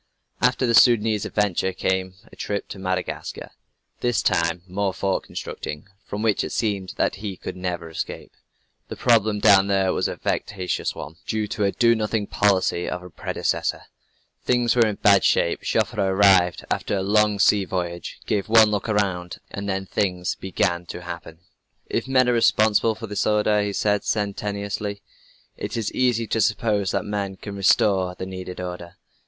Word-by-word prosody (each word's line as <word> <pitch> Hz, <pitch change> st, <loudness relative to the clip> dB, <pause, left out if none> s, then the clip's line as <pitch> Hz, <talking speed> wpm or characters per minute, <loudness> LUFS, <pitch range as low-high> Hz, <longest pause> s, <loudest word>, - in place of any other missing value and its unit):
After 125 Hz, +1 st, +2 dB
the 120 Hz, -, +1 dB
Soudanese 110 Hz, -3 st, +4 dB
adventure, 95 Hz, -2 st, 0 dB
came 95 Hz, 0 st, -1 dB, 0.2 s
a -, -, -14 dB
trip 100 Hz, -1 st, -3 dB
to 100 Hz, -, -8 dB
Madagascar 95 Hz, -1 st, -4 dB, 0.5 s
this 120 Hz, -2 st, 0 dB
time, 85 Hz, -2 st, +1 dB
more 95 Hz, +1 st, -2 dB
fort 95 Hz, -1 st, -1 dB
constructing, 75 Hz, +1 st, -6 dB, 0.2 s
from 105 Hz, +2 st, -4 dB
which 110 Hz, -3 st, +2 dB
it -, -, -5 dB
seemed 100 Hz, -4 st, -2 dB
that -, -, 0 dB
he 100 Hz, -2 st, -6 dB
could -, -, -7 dB
never 90 Hz, -2 st, -4 dB
escape. 80 Hz, -, -6 dB, 0.6 s
The -, -, -6 dB
problem 110 Hz, -3 st, +3 dB
down 100 Hz, -1 st, +5 dB
there 95 Hz, -1 st, +2 dB
was -, -, 0 dB
a -, -, -4 dB
vexatious 95 Hz, -3 st, -2 dB
one, 80 Hz, +2 st, -8 dB
due 110 Hz, -1 st, -1 dB
to 105 Hz, -, -1 dB
a 100 Hz, -, +2 dB
do 115 Hz, +1 st, +4 dB
nothing 110 Hz, -1 st, -1 dB
policy 95 Hz, -4 st, +1 dB
of 90 Hz, 0 st, -5 dB
a 90 Hz, -, -11 dB
predecessor. -, -, -2 dB, 0.6 s
Things 120 Hz, -1 st, +2 dB
were 115 Hz, -2 st, +5 dB
in 105 Hz, -, -2 dB
bad 100 Hz, -2 st, +4 dB
shape. -, -, +2 dB
Joffre 105 Hz, -, 0 dB
arrived, 95 Hz, -2 st, +4 dB
after -, -, -1 dB
a 95 Hz, -, -1 dB
long 105 Hz, +1 st, +3 dB
sea 100 Hz, 0 st, +4 dB
voyage, 85 Hz, -2 st, -4 dB
gave 105 Hz, 0 st, -1 dB
one 110 Hz, -1 st, +6 dB
look 105 Hz, +2 st, -2 dB
around, 95 Hz, -4 st, -1 dB
and 100 Hz, 0 st, -5 dB
then 95 Hz, 0 st, -2 dB
things 90 Hz, -2 st, -1 dB
began 85 Hz, -2 st, -2 dB
to 90 Hz, -, -7 dB
happen. 85 Hz, -1 st, -8 dB, 0.5 s
"If -, -, -2 dB
men 130 Hz, -1 st, +3 dB
are 125 Hz, -, +3 dB
responsible 110 Hz, -1 st, +3 dB
for 115 Hz, -, -7 dB
this 105 Hz, -2 st, -4 dB
disorder," 105 Hz, 0 st, +2 dB
he 100 Hz, 0 st, -1 dB
said 105 Hz, 0 st, 0 dB
sententiously, 100 Hz, 0 st, -3 dB, 0.5 s
"it -, -, -4 dB
is 115 Hz, -, -2 dB
easy 120 Hz, -3 st, +1 dB
to 110 Hz, 0 st, 0 dB
suppose 105 Hz, -3 st, +1 dB
that -, -, -1 dB
men 100 Hz, -2 st, -3 dB
can 100 Hz, +2 st, -8 dB
restore 95 Hz, -2 st, +2 dB
the 95 Hz, -, -6 dB
needed 95 Hz, -1 st, -7 dB
order." 90 Hz, -1 st, -7 dB
100 Hz, 170 wpm, -23 LUFS, 95-105 Hz, 0.6 s, one